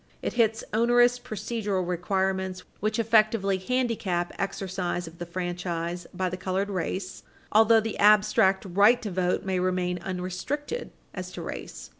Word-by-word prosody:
It -, -, -2 dB
hits 225 Hz, -2 st, +2 dB
onerous 240 Hz, +2 st, +4 dB
procedural 215 Hz, -5 st, -3 dB
requirements 190 Hz, +1 st, -1 dB, 0.2 s
which 215 Hz, +1 st, -1 dB
effectively 215 Hz, -3 st, +3 dB
handicap 200 Hz, -6 st, -1 dB
exercise 185 Hz, -2 st, -2 dB
of 165 Hz, +1 st, -12 dB
the 175 Hz, -, -5 dB
franchise 175 Hz, -1 st, -3 dB
by 185 Hz, +1 st, -2 dB
the 180 Hz, 0 st, -4 dB
colored 190 Hz, +2 st, -2 dB
race 185 Hz, +1 st, -3 dB, 0.3 s
although 225 Hz, +1 st, +6 dB
the 225 Hz, 0 st, -4 dB
abstract 205 Hz, -2 st, +4 dB
right 205 Hz, +6 st, +5 dB
to 210 Hz, -, -3 dB
vote 180 Hz, +1 st, 0 dB
may 190 Hz, -1 st, 0 dB
remain 180 Hz, -1 st, 0 dB
unrestricted 185 Hz, -, -4 dB, 0.2 s
as -, -, -6 dB
to -, -, -6 dB
race. -, -, -7 dB
190 Hz, 140 wpm, -27 LUFS, 180-220 Hz, 0.3 s, although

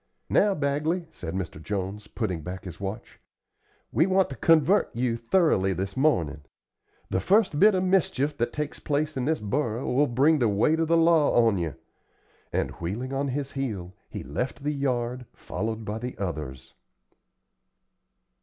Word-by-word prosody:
"Now, 205 Hz, -1 st, +4 dB
Bagley," 155 Hz, +4 st, 0 dB
said 90 Hz, -, -6 dB
Mr. 85 Hz, -5 st, -4 dB
Jones, 100 Hz, +3 st, -4 dB
putting 95 Hz, -9 st, -3 dB
back 90 Hz, +4 st, -6 dB
his 85 Hz, -3 st, -8 dB
watch, 100 Hz, +3 st, -6 dB, 0.7 s
"we 160 Hz, -, +3 dB
want 190 Hz, -4 st, +2 dB
to -, -, -5 dB
convert 165 Hz, +7 st, +4 dB
you 120 Hz, -1 st, 0 dB
thoroughly 115 Hz, -, +2 dB
this 95 Hz, +2 st, -4 dB
mornin'. 85 Hz, -, +1 dB, 0.7 s
The 95 Hz, -, +1 dB
first 190 Hz, -, +3 dB
bit 210 Hz, 0 st, +6 dB
of 185 Hz, -, +1 dB
mischief 160 Hz, -6 st, +1 dB
that 120 Hz, +1 st, 0 dB
takes 150 Hz, 0 st, -4 dB
place 150 Hz, +1 st, -1 dB
in 130 Hz, -2 st, -1 dB
this 160 Hz, +2 st, +1 dB
borough 115 Hz, +2 st, -1 dB
will 145 Hz, +3 st, +4 dB
bring 140 Hz, +6 st, +3 dB
the 120 Hz, -4 st, +3 dB
weight 130 Hz, +11 st, +2 dB
of 165 Hz, -, +1 dB
the 165 Hz, +1 st, +4 dB
law 160 Hz, -7 st, +4 dB
on 105 Hz, -5 st, +2 dB
you;" 80 Hz, -5 st, -3 dB, 0.8 s
and, -, -, -1 dB
wheeling 115 Hz, +10 st, -3 dB
on 140 Hz, +1 st, 0 dB
his 140 Hz, +1 st, -3 dB
heel, 105 Hz, -10 st, -4 dB, 0.2 s
he -, -, -6 dB
left 125 Hz, -, -4 dB
the 150 Hz, +1 st, 0 dB
yard, 125 Hz, -3 st, -2 dB
followed 110 Hz, +3 st, -4 dB
by 105 Hz, +2 st, -3 dB
the 125 Hz, +2 st, -6 dB
others. 75 Hz, -9 st, -5 dB
125 Hz, 165 wpm, -26 LUFS, 100-150 Hz, 0.8 s, bit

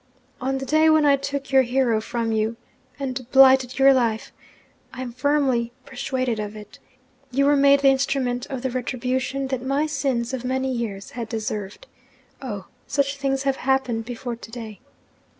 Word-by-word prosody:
On 270 Hz, +1 st, -1 dB
the 270 Hz, -, -4 dB
day 310 Hz, +4 st, +4 dB
when 315 Hz, -1 st, +4 dB
I 285 Hz, -1 st, +6 dB
took 275 Hz, 0 st, -4 dB
your 265 Hz, -1 st, +6 dB
hero 245 Hz, -3 st, +1 dB
from 230 Hz, 0 st, -2 dB
you 220 Hz, +1 st, 0 dB, 0.4 s
and 260 Hz, -3 st, -4 dB
blighted 265 Hz, -2 st, +6 dB
your 275 Hz, 0 st, +7 dB
life 230 Hz, -4 st, 0 dB, 0.6 s
I 260 Hz, -, -6 dB
am 245 Hz, -, -6 dB
firmly 255 Hz, -3 st, +1 dB
persuaded 255 Hz, -3 st, -2 dB
of 210 Hz, 0 st, -5 dB
it! 210 Hz, -1 st, -12 dB, 0.5 s
you 275 Hz, +2 st, +1 dB
were 290 Hz, +1 st, +5 dB
made 280 Hz, 0 st, +5 dB
the 275 Hz, -, +6 dB
instrument 265 Hz, -2 st, 0 dB
of 265 Hz, -2 st, -5 dB
the 260 Hz, -, -1 dB
retribution 255 Hz, +2 st, -2 dB
that 260 Hz, -2 st, -2 dB
my 275 Hz, +3 st, +1 dB
sins 265 Hz, -5 st, -1 dB
of 255 Hz, -2 st, -3 dB
many 260 Hz, +1 st, -1 dB
years 215 Hz, -5 st, -4 dB
had 235 Hz, -2 st, -6 dB
deserved. 215 Hz, -3 st, -4 dB, 0.6 s
Oh, 205 Hz, -8 st, -5 dB, 0.2 s
such 280 Hz, 0 st, 0 dB
things 270 Hz, -1 st, -1 dB
have 275 Hz, -1 st, 0 dB
happened 255 Hz, -4 st, 0 dB
before 245 Hz, 0 st, -5 dB
to 225 Hz, -, -12 dB
day! 225 Hz, -3 st, -8 dB
260 Hz, 170 wpm, -23 LUFS, 235-275 Hz, 0.6 s, your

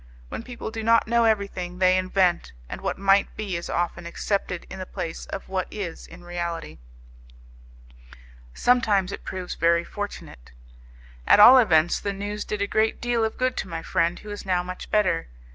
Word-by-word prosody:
When -, -, -5 dB
people 235 Hz, -2 st, -7 dB
do 225 Hz, -, -5 dB
not 230 Hz, 0 st, +3 dB
know 235 Hz, 0 st, +3 dB
everything, 200 Hz, -5 st, -1 dB
they 185 Hz, 0 st, +4 dB
invent, 185 Hz, -, +1 dB
and -, -, -7 dB
what -, -, -2 dB
might 195 Hz, 0 st, +3 dB
be 205 Hz, -4 st, -3 dB
is 170 Hz, -, -5 dB
often 175 Hz, 0 st, -2 dB
accepted 180 Hz, 0 st, -2 dB
in 190 Hz, -, -9 dB
the 185 Hz, -, -5 dB
place 165 Hz, -1 st, -6 dB
of -, -, -6 dB
what 190 Hz, -1 st, -2 dB
is 190 Hz, -6 st, -6 dB
in 175 Hz, +1 st, -13 dB
reality; 170 Hz, -, -5 dB, 1.7 s
sometimes 205 Hz, -, +2 dB
it -, -, -7 dB
proves 185 Hz, -1 st, -5 dB
very 170 Hz, 0 st, +2 dB
fortunate. 170 Hz, -, -8 dB, 0.7 s
At -, -, +6 dB
all 250 Hz, +5 st, +10 dB
events 175 Hz, -7 st, +3 dB
the 200 Hz, -, -3 dB
news 205 Hz, +1 st, -5 dB
did 210 Hz, -1 st, -2 dB
a -, -, -1 dB
great 220 Hz, +2 st, +1 dB
deal 240 Hz, -1 st, 0 dB
of 220 Hz, -, -2 dB
good 255 Hz, 0 st, 0 dB
to -, -, -3 dB
my 165 Hz, -2 st, -5 dB
friend, 170 Hz, -1 st, 0 dB
who 210 Hz, -, -10 dB
is 205 Hz, -, -6 dB
now 180 Hz, -2 st, 0 dB
much 185 Hz, 0 st, -8 dB
better. 190 Hz, -, +1 dB
190 Hz, 180 wpm, -25 LUFS, 175-210 Hz, 1.7 s, all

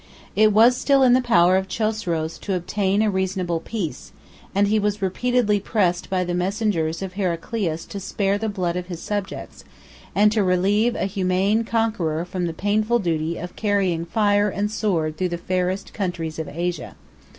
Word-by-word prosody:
It 215 Hz, 0 st, +5 dB
was 230 Hz, +4 st, +6 dB
still 270 Hz, +1 st, +3 dB
in 250 Hz, -1 st, +6 dB
the 255 Hz, -, +4 dB
power 185 Hz, -7 st, +4 dB
of 190 Hz, 0 st, -1 dB
Chosroes 185 Hz, -6 st, -2 dB
to 195 Hz, -, -2 dB
obtain 195 Hz, +3 st, 0 dB
a 215 Hz, -, +2 dB
reasonable 185 Hz, -3 st, -1 dB
peace; 185 Hz, -4 st, -5 dB, 0.4 s
and 200 Hz, +1 st, +3 dB
he 215 Hz, +1 st, +2 dB
was 210 Hz, 0 st, -1 dB
repeatedly 210 Hz, +2 st, +1 dB
pressed 185 Hz, -4 st, 0 dB
by 185 Hz, -1 st, +1 dB
the 175 Hz, 0 st, -3 dB
messengers 180 Hz, -3 st, -1 dB
of 190 Hz, -1 st, -6 dB
Heraclius 180 Hz, -2 st, -2 dB
to 200 Hz, -, -7 dB
spare 195 Hz, +1 st, -1 dB
the 220 Hz, 0 st, -1 dB
blood 180 Hz, -4 st, -2 dB
of 180 Hz, 0 st, -4 dB
his 175 Hz, -3 st, -6 dB
subjects, 205 Hz, 0 st, -5 dB, 0.5 s
and 210 Hz, +1 st, +5 dB
to 215 Hz, 0 st, +2 dB
relieve 200 Hz, +6 st, +2 dB
a -, -, -1 dB
humane 195 Hz, +2 st, +1 dB
conqueror 215 Hz, -9 st, 0 dB
from 180 Hz, -1 st, -3 dB
the -, -, -2 dB
painful 215 Hz, +6 st, +1 dB
duty 165 Hz, -5 st, -1 dB
of 175 Hz, +1 st, -7 dB
carrying 195 Hz, -6 st, 0 dB
fire 205 Hz, +2 st, +2 dB
and 205 Hz, +2 st, -2 dB
sword 170 Hz, -8 st, -1 dB
through 185 Hz, +1 st, 0 dB
the 170 Hz, -, -3 dB
fairest 185 Hz, +2 st, -2 dB
countries 170 Hz, -5 st, -3 dB
of 160 Hz, -, -4 dB
Asia. 175 Hz, +2 st, -4 dB
195 Hz, 175 wpm, -23 LUFS, 175-210 Hz, 0.5 s, was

